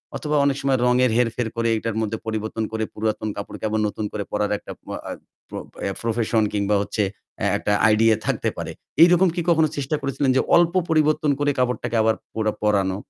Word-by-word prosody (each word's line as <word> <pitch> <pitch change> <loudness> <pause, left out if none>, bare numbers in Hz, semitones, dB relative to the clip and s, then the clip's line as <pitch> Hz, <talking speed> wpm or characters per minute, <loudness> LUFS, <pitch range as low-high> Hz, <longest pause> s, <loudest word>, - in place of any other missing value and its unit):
অথবা 150 0 -2
অনেক 140 -1 +1
সময় 135 -1 +2
রঙের 125 -1 +3
হেরফের 120 -1 0
করে 115 0 0
এটার 115 0 -3
মধ্যে 110 0 -2
পরিবর্তন 110 0 -3
করে 110 0 -2
পুরাতন 110 0 -2
কাপড়কে 100 +1 -6
আবার 110 0 0
নতুন 105 +1 -4
করে 105 -1 -3
পরার 105 0 0
একটা - - -11
প - - -66 0.3
আ - - -3 0.4
প - - -34 0.3
অ্যা 100 - -1
প্রফেশন 115 -1 +1
কিংবা 100 0 +1
হচ্ছে 105 +1 -1 0.4
অ্যা - - 0
একটা 105 - -2 0.2
আইডিয়া 110 +1 +4
থাকতে - - 0
পারে। - - -4 0.3
এইরকম 180 +2 +5
কি 175 - 0
কখনো 160 -2 +4
চেষ্টা 140 +2 -1
করেছিলেন 140 0 -1
যে - - +4
অল্প 170 0 +4 0.2
পরিবর্তন 155 -1 +2
করে 145 0 +2
কাপড়টাকে 125 -1 -1
আবার 110 0 +3 0.2
পরা 110 -1 0
পরানো? 100 -2 +1
115 Hz, 190 wpm, -22 LUFS, 110-140 Hz, 0.4 s, এইরকম